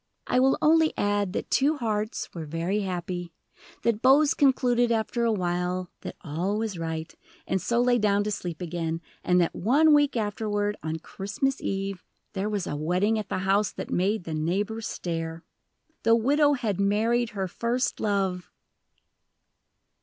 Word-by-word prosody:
I 250 - +2
will 265 +1 +4
only 320 0 +4
add 205 -2 +1
that - - -4
two 295 +3 +3
hearts 215 -3 -2
were 165 -3 -6
very 170 +6 -1
happy, 175 -2 -4 0.5
that 230 -2 +1
Bose 280 +3 +5
concluded 245 -3 +3
after 230 +1 0
a 230 - +3
while 180 -2 -1
that - - -7
all 175 +7 -2
was 215 -5 -3
right, 160 -1 -4 0.3
and 190 - -1
so 235 +6 +1
lay 245 0 +3
down 205 -1 +2
to 210 - -2
sleep 175 -4 -4
again, 165 -1 -3 0.2
and 180 0 +3
that 170 - +1
one 295 - +4
week 290 -3 +3
afterward, 205 -1 -1
on 160 0 -3
Christmas 210 - -3
Eve, 195 -1 -3 0.3
there 200 +1 -2
was 205 -4 -2
a - - -3
wedding 180 +9 +1
at 215 - -6
the - - -1
house 200 +2 +2
that - - -6
made 195 +2 +1
the 165 - -5
neighbors 200 +8 -1
stare. 165 -1 -4 0.6
The 230 +1 +5
widow 290 +5 +3
had 220 -8 -2
married 225 +4 +2
her 190 -1 -1
First 235 +6 -1
Love! 195 -4 -1
205 Hz, 160 wpm, -26 LUFS, 180-235 Hz, 0.6 s, Bose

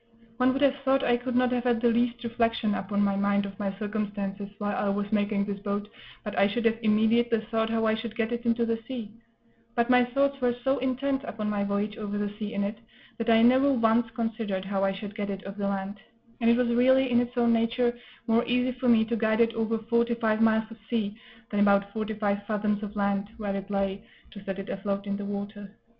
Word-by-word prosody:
One 255 +1 +4
would 270 +2 0
have 275 0 +4
thought 270 0 +1
I 240 - +3
could 245 +1 -3
not 250 0 +3
have 250 0 -1
had 240 -2 +2
the 240 0 +3
least 240 +1 0
reflection 230 -2 0
upon 205 +1 -1
my 200 -1 +1
mind 200 0 +1
of 195 +1 -9
my 200 -2 -1
circumstances 205 -1 -3
while 205 -1 -2
I 205 - 0
was 205 0 -2
making 205 -1 +1
this 200 -1 -4
boat 205 0 -3 0.4
but 210 - -5
I 200 - +4
should 230 +3 -2
have 225 0 +2
immediately 225 +1 +3
thought 225 -1 +1
how 225 0 0
I 220 - +3
should 220 0 -4
get 225 0 -1
it 235 0 -3
into 235 0 +1
the 230 0 -1
sea; 235 -5 -6 0.6
but 235 0 +2
my 250 0 +6
thoughts 275 +2 0
were 245 -1 +2
so 270 +1 +1
intent 265 +1 -1
upon 210 -1 -3
my 205 -1 0
voyage 205 +1 -2
over 205 -1 -4
the 205 0 -2
sea 210 -1 -4
in 200 - 0
it 210 +2 -3 0.4
that 230 0 -1
I 225 0 +6
never 260 +4 +5
once 230 -2 +2
considered 220 -5 -2
how 195 0 -1
I 195 - +2
should 200 +1 -7
get 205 -1 -4
it 195 -1 -5
off 195 +1 -7
the 200 -1 -1
land; 200 +1 -3 0.4
and 230 -1 +3
it 235 - +5
was 250 -1 +2
really, 260 +2 +4
in 240 - +5
its 245 +1 -5
own 235 -1 +4
nature, 240 +1 +1 0.3
more 230 +1 +3
easy 250 +1 +1
for 250 -1 +2
me 225 -2 +5
to 235 +1 -1
guide 220 0 +1
it 230 0 +3
over 225 0 0
forty 235 +1 +1
five 220 -2 0
miles 220 0 +4
of 225 - -10
sea 210 -3 -1 0.4
than 205 - 0
about 200 0 +3
forty 220 0 -3
five 205 -1 0
fathoms 210 -1 0
of 210 0 -6
land, 200 0 0
where 205 -3 -3
it 195 +1 -5
lay, 195 0 -1 0.3
to 200 - -10
set 195 -1 -4
it 195 - -6
afloat 200 0 -3
in 200 0 -2
the 205 - -5
water. 205 0 -5
220 Hz, 240 wpm, -27 LUFS, 205-235 Hz, 0.6 s, my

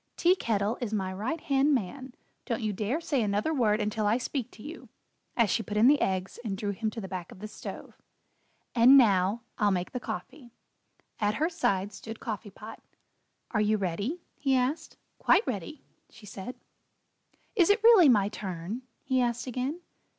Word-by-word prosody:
"Tea 355 +2 +4
Kettle 215 - -1
is 220 -3 -2
my 190 -2 -2
right 225 - -3
hand 275 +1 +3
man. 255 +4 -4 0.3
Don't 230 -2 -2
you 215 -1 0
dare 215 - -1
say 290 -6 0
another 210 +8 0
word 220 -6 +2
until 210 0 -1
I 215 +3 +3
speak 255 -1 -3
to 215 - -13
you" 315 +3 -9 0.5
as 230 -4 +3
she 230 - +1
put 210 -1 -4
in 215 - +5
the 285 +3 +5
eggs, 185 +1 -1
and 200 -4 -3
drew 205 +1 -2
him 220 +2 -2
to 220 - -7
the 195 - -6
back 185 -3 -6
of - - -12
the 210 +3 -7
stove. - - -9 0.8
"And 250 +3 +8
now, 205 -2 +4 0.2
I'll 210 -2 +4
make 180 -2 -1
the 250 - -3
coffee." 255 +1 -7 0.7
At 210 0 +1
her 320 +4 0
side 200 - 0
stood 225 +3 -8
Coffee 210 -2 -5
Pot. 215 +3 -11 0.7
"Are 215 - +1
you 215 +1 +2
ready?" 200 - -3 0.2
he 270 -2 +2
asked. 260 +5 -1 0.2
"Quite 450 - +4
ready," 215 - -5 0.3
she 220 - -15
said. 205 +5 -7 1.0
"Is 360 -5 +4
it 415 +2 +3
really 440 -10 +8
my 205 -5 +4
turn?" 195 +1 -5 0.2
he 260 -1 +1
asked 240 -1 -1
again. 260 +6 -3
225 Hz, 185 wpm, -28 LUFS, 205-265 Hz, 1.0 s, And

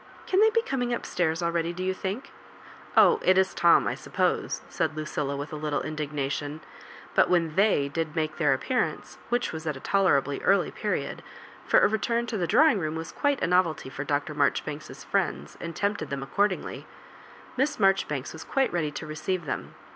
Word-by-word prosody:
Can 380 - +2
they 440 +1 +7
be 460 +1 +1
coming 245 - -1
up - - -7
stairs 165 -1 0
ah 170 0 0
eady, 170 0 0
do 185 +1 -5
you 190 0 0
think? 195 +8 -5 0.7
Oh, 450 - +7
it 185 - +4
is 190 0 +3
Tom, 170 -1 +5
I - - 0
suppose," - - -1
said 155 - -2
Lucilla, 150 -2 -2
with 145 +2 -6
a - - -2
little 150 -1 -2
indignation! 150 0 -3 0.5
But - - +4
when 165 -3 +2
T?iey 165 -9 +2
did 160 0 -2
make 155 -1 -1
their 150 -3 +3
appearance, 250 - -2
which 245 0 0
was 160 0 -6
at 150 -3 -2
a - - -9
tolerably 145 -7 +2
early 195 - +3
period - - -3 0.2
— - - -20
^for - - +6
a - - +7
return 225 +3 0
lo 220 - -2
the 175 - 0
drawing 235 - +5
room 155 -2 -2
was 160 0 -5
quite 285 -2 0
a - - +3
novelty 175 -6 +1
for 135 - -4
Dr. 145 +1 -1
Marjoribanks*s 150 +1 -1
friends, 70 +3 -1
and 170 -1 -5
tempted 205 +4 -1
them 140 -1 -3
accordingly 200 +7 -1 0.4
— - - -20
^Miss 270 +4 0
Marjori 195 -2 +3
banks 140 -3 -4
was 160 - -8
quite 270 -6 0
ready 160 -4 0
to 150 +2 -7
receive 155 +3 -3
them. 130 - -5
165 Hz, 200 wpm, -27 LUFS, 150-200 Hz, 0.7 s, they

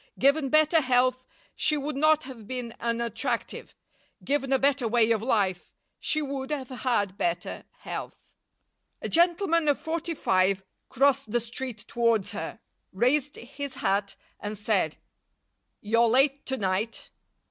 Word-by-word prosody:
Given 280 +1 +3
better 310 +2 +4
health, 255 -1 +2 0.3
she 305 - +2
would 290 0 -3
not 310 +2 +4
have 250 -5 -10
been 245 -2 -5
unattractive; 235 +1 -2 0.5
given 275 -1 0
a 270 - +5
better 275 -2 +2
way 230 0 +3
of 220 -2 +2
life, 200 -7 0 0.3
she 310 0 0
would 270 -1 -4
have 280 -4 -3
had 225 -6 -1
better 175 0 -2 0.2
health. - - -7 0.7
A - - -1
gentleman 335 -1 +3
of 290 - +3
forty 330 +1 -3
five 190 -4 +2 0.3
crossed 275 -3 +2
the 240 - +2
street 235 -1 -6
towards 230 -4 +1
her, - - -6 0.3
raised 260 +8 +1
his 280 +2 -7
hat, 200 +1 0 0.2
and 210 +1 -5
said, 200 -6 0 0.9
"You're 230 +2 +3
late 275 +3 +2
to 265 - -1
night." 200 +2 -2
255 Hz, 135 wpm, -27 LUFS, 220-280 Hz, 0.9 s, a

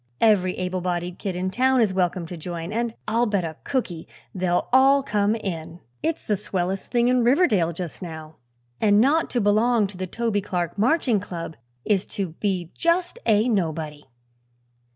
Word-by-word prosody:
"Every 190 -5 +3
able 185 0 -2
bodied 175 0 -3
kid 195 -3 -3
in 185 +1 -2
town 260 +4 +3
is 215 -5 +3
welcome 180 -1 0
to 175 - -7
join, 170 +2 -5
and 230 0 -1
I'll 235 +2 +2
bet 200 -4 0
a 160 -1 -6
cookie 190 -12 -3 0.3
they'll 180 -2 0
all 270 +1 +6
come 210 -3 +1
in. 170 -5 -5 0.2
It's 325 0 -2
the 210 - +1
swellest 190 -1 -3
thing 240 -1 +2
in 250 -1 +3
Riverdale, 230 - +3
just 170 +1 -6
now, 160 -3 -8 0.4
and 205 -1 +4
not 290 +8 +3
to 245 - 0
belong 215 +2 +3
to 195 -1 -8
the 185 0 -4
Toby 225 +1 -1
Clark 180 -4 -3
Marching 240 0 +2
Club 170 -5 -6 0.3
is 200 -3 +1
to 195 -3 -1
be 185 -4 -1
just 350 +6 0
a 215 +2 +4
nobody." 160 -8 -2
200 Hz, 175 wpm, -24 LUFS, 175-235 Hz, 0.4 s, all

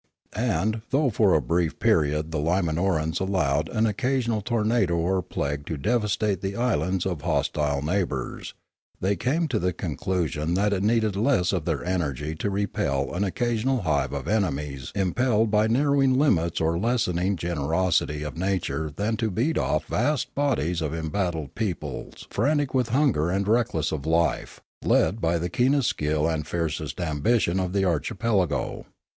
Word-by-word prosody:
And, 110 -1 0
though 135 -1 +2
for 105 -4 +3
a 75 - +3
brief 85 +5 0
period 75 +2 +1
the 80 - -1
Limanorans 80 0 0
allowed 80 -6 0
an 110 0 +1
occasional 120 -1 0
tornado 110 -4 +1
or 90 +3 +1
plague 70 -4 -3
to 80 - -3
devastate 105 - 0
the 95 0 -3
islands 95 -7 0
of 90 -6 -2
hostile 75 -2 0
neighbours, 80 -6 -2 0.4
they 100 +2 +1
came 150 - 0
to 115 -5 0
the 90 -1 0
conclusion 85 -1 -2
that 105 +2 +2
it 95 - 0
needed 110 -1 +2
less 100 -4 +2
of 90 -5 -1
their 80 -2 -2
energy 80 -5 -2
to 80 +6 -2
repel 85 -9 -1
an 90 +4 0
occasional 120 +4 0
hive 70 -5 0
of - - -4
enemies 75 -10 -1
im 95 -3 0
pelled 115 -4 +2
by 105 +1 +3
narrowing 135 +2 +3
limits 85 - +2
or 80 0 +2
the - - -3
lessening 100 -6 +1
generosity 80 -1 0
of 75 - -5
nature 90 -4 -1
than 105 +5 0
to 110 - 0
beat 120 - 0
off - - 0
vast 135 -4 0
bodies 110 - 0
of 80 0 -2
embattled 80 -2 -2
peo 105 -6 -1
ples - - -8
frantic 145 -2 +1
with 125 -3 +1
hunger 120 - +2
and 95 +2 0
reckless 110 - +1
of 75 -1 -4
life, 85 +1 0 0.2
led 110 - +2
by 85 +1 +2
the 85 +1 -2
keenest 130 - +2
skill 75 +1 0
and 80 -2 -1
fieriest 85 0 -3
ambition 85 +4 +1
of 90 -1 -1
the 95 0 +1
archipelago. 95 - -1
95 Hz, 160 wpm, -25 LUFS, 80-110 Hz, 0.4 s, for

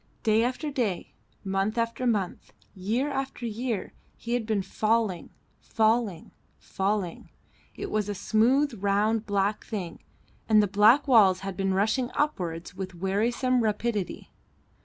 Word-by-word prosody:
Day 220 0 +3
after 260 +5 -2
day, 230 -10 -2 0.3
month 195 +3 -1
after 230 +2 -1
month, 205 -6 -2 0.2
year 225 +10 -1
after 270 -3 -4
year, 230 -1 -3 0.2
he 235 - -4
had 240 -3 -1
been 210 -3 0
falling, 215 -2 0 0.3
falling, 220 -5 0 0.3
falling; 195 -3 -3 0.5
it - - -6
was 210 -1 0
a 205 - -2
smooth, 250 +8 +2
round, 210 +2 +1
black 200 +1 0
thing, 185 -7 -5 0.5
and 215 -1 +6
the 210 - +5
black 215 +9 +5
walls 200 -8 +5
had 195 -1 -5
been 195 0 0
rushing 220 +6 +1
upwards 175 - -2
with 185 0 -6
wearisome 235 +7 +1
rapidity. 215 -3 -2
215 Hz, 135 wpm, -27 LUFS, 195-235 Hz, 0.5 s, and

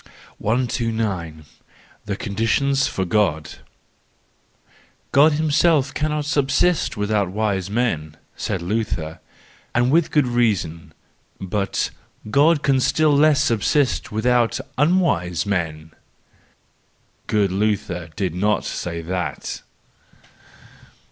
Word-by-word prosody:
129. 110 - -2 0.6
The 105 -2 -2
Conditions 115 +7 0
for 95 - -2
God 85 -5 0 0.7
.—" - - -35
God 145 +3 +5
himself 150 -1 +2
cannot 150 0 -1
subsist 145 +1 +1
without 105 -2 0
wise 100 -1 -1
men 100 -10 -1
/ - - -39
1 - - -39
said 95 - -3
Luther, 90 -5 -3 0.6
and 120 +1 +3
with 165 +1 +3
good 150 -3 +2
reason; 105 -10 -1 0.4
but 100 +1 -2 0.2
" - - -15
God 150 +4 +4
can 135 -2 +3
still 150 +3 +2
less 150 +1 +4
subsist 130 +2 +1
with¬ 110 +1 -4
out 125 -2 +2 0.2
unwise 140 - +1
men,"—good 85 +3 -6
Luther 95 -4 -1
did 95 -5 -2
not 105 +4 0
say 85 -1 -4
that! 90 +1 -4
110 Hz, 105 wpm, -21 LUFS, 95-140 Hz, 0.7 s, God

